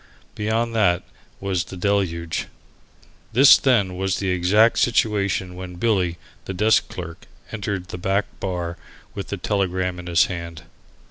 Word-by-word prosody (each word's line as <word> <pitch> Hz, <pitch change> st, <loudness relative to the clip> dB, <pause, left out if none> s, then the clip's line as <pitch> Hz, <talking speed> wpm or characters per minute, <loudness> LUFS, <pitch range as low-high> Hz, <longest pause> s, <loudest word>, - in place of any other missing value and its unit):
Beyond 115 Hz, +2 st, -1 dB
that 95 Hz, -5 st, +2 dB, 0.4 s
was 95 Hz, -3 st, -1 dB
the 95 Hz, -, -9 dB
deluge. 90 Hz, -4 st, -1 dB, 0.9 s
This 130 Hz, +4 st, +8 dB
then 105 Hz, -9 st, +2 dB
was 95 Hz, 0 st, -1 dB
the 95 Hz, -, -2 dB
exact 100 Hz, +6 st, +3 dB
situation 100 Hz, -5 st, +1 dB
when 90 Hz, 0 st, -8 dB
Billy, 90 Hz, -4 st, 0 dB, 0.3 s
the 95 Hz, -, -5 dB
desk 110 Hz, +4 st, +3 dB
clerk, 85 Hz, -2 st, -8 dB, 0.2 s
entered 100 Hz, -3 st, -4 dB
the 90 Hz, -, -6 dB
back 95 Hz, +2 st, +1 dB
bar 90 Hz, -3 st, -3 dB, 0.4 s
with 100 Hz, -, -6 dB
the 100 Hz, -, -4 dB
telegram 95 Hz, -2 st, -1 dB
in 90 Hz, -, -9 dB
his 85 Hz, -1 st, +4 dB
hand. 85 Hz, -3 st, -6 dB
95 Hz, 140 wpm, -22 LUFS, 90-105 Hz, 0.9 s, This